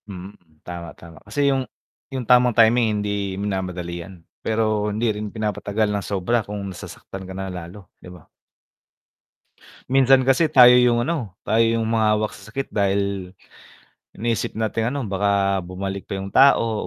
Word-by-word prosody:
Mm, 95 +1 -8 0.3
tama, 85 -1 -7
tama 85 -1 -14
kasi 145 0 -2
'yung 135 -1 0 0.4
'yung 130 -3 -5
tamang 125 -1 +4
timing 115 -2 +4
hindi 100 -2 -3
minamadali 90 -3 -4
'yan, 85 -2 -13 0.2
pero 110 -1 0
hindi 110 +3 -1
rin 105 0 -5
pinapatagal 105 0 -2
ng 100 - -1
sobra 105 +5 0
kung 105 0 -6
nasasaktan 95 +1 -10
ka - - -6
na 95 -1 -5
lalo, 90 +3 -9 0.2
'di - - -12
ba? 90 -4 -14 1.6
Minsan 135 0 +5
kasi 135 +5 +4
tayo 125 -2 +8
'yung 120 -1 +4
ano, 130 - -3
tayo 115 +1 +2
'yung 115 0 +1
humahawak 110 -1 +1
sa 105 +1 -14
sakit 135 +4 -4
dahil 100 -2 -1 0.8
iniisip 115 +1 -2
nating 110 +2 -1
ano 140 - -2
baka 100 0 +1
bumalik 95 +2 -5
pa - - -4
'yung 95 0 -5
tao 115 -5 +4
105 Hz, 155 wpm, -22 LUFS, 95-115 Hz, 1.6 s, tayo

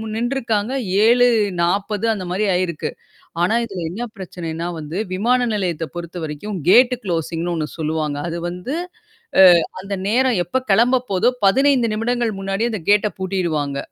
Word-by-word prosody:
நின்றுருக்காங்க. 235 -2 -1 0.3
7:40 205 -4 +2
அந்த 200 -4 -5
மாரி 195 +4 0
ஆயிருக்கு. 180 -3 -2 0.5
ஆனா 180 +6 +2
இதல 195 -7 -5
என்ன 205 +8 -5
பிரச்சனைன்னா 170 -3 -5
வந்து 155 +3 -6 0.2
விமான 245 +6 +2
நிலையத்த 175 -6 -1
பொறுத்தவரைக்கும் 175 +2 -5
கேட் 250 +5 +6
கு்ளோசிங்ன்னு 170 -1 -2
ஒண்ணு 155 -2 -2
சொல்லுவாங்க. 155 -2 -2
அது 170 - -4
வந்து 180 - -5 0.7
அ - - +10 0.4
அந்த 200 +1 -4
நேரம் 245 -2 +2
எப்ப 260 +5 -1
கெளம்ப 245 +4 +3
போதோ, 195 +5 +3 0.2
15 255 +1 +3
நிமிடங்கள் 230 -1 -1
முன்னாடிய 195 +4 -1
அந்த 215 - -3
கேட்ட 210 +1 +4
பூட்டிடுவாங்க. 170 -7 -2
195 Hz, 135 wpm, -20 LUFS, 170-230 Hz, 0.7 s, அ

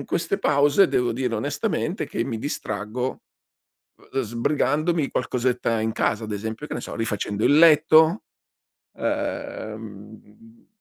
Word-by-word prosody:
in - - -6
queste 170 +3 -1
pause 145 +2 +4
devo 120 -1 +1
dire 125 -1 -2
onestamente 110 - -2
che - - -2
mi 115 -4 -4
distraggo, 110 -1 -4 0.9
uhm, 135 - 0
sbrigandomi 145 +7 0
qualcosetta 125 -2 0
in 110 0 -1
casa 110 0 0
ad 110 - -5
esempio, 110 +7 -5
che - - -9
ne - - -3
so, - - -7
rifacendo 105 -2 -2
il 145 - +5
letto, 160 +3 +6 0.7
uhm, 110 +1 -6
120 Hz, 130 wpm, -24 LUFS, 110-145 Hz, 0.9 s, letto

